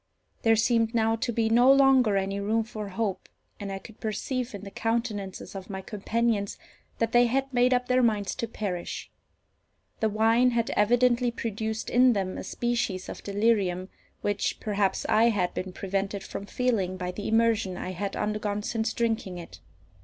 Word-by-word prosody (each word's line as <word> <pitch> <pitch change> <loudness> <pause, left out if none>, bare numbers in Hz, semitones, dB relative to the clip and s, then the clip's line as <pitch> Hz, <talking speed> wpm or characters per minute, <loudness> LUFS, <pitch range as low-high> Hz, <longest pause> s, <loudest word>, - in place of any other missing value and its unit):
There 225 0 +4
seemed 230 +1 +2
now 225 0 +3
to 235 +2 -1
be 225 -1 +1
no 240 +4 +6
longer 265 -6 +5
any 195 +1 -1
room 220 +3 +1
for 215 -2 -6
hope, 200 0 -3 0.3
and 200 -1 -5
I 195 - -3
could 220 +3 -13
perceive 235 +2 -3
in 200 - -8
the 200 - -8
countenances 225 -4 -3
of 195 0 -8
my 190 -1 -5
companions 210 0 -1 0.4
that 230 0 0
they 240 +1 +5
had 270 +2 -1
made 250 +1 +4
up 250 0 +1
their 255 0 +3
minds 210 -4 +1
to 230 - -2
perish. 195 -6 -5 0.9
The 220 - +2
wine 225 +4 +4
had 230 - 0
evidently 245 +3 +3
produced 220 -1 -3
in 250 0 +5
them 190 -3 -2
a - - -5
species 230 -6 -2
of - - -7
delirium, 200 -3 +1 0.3
which, 205 -1 -1
perhaps, 205 -2 0
I 220 +2 +4
had 200 -6 +1
been 185 0 -4
prevented 195 +1 -3
from 200 - -7
feeling 205 -8 0
by 180 0 -3
the 205 +3 -6
immersion 225 -4 +2
I 185 - -4
had 195 +2 -4
undergone 210 -1 -2
since 225 0 -1
drinking 225 -6 -1
it. 170 - -10
220 Hz, 175 wpm, -27 LUFS, 200-235 Hz, 0.9 s, no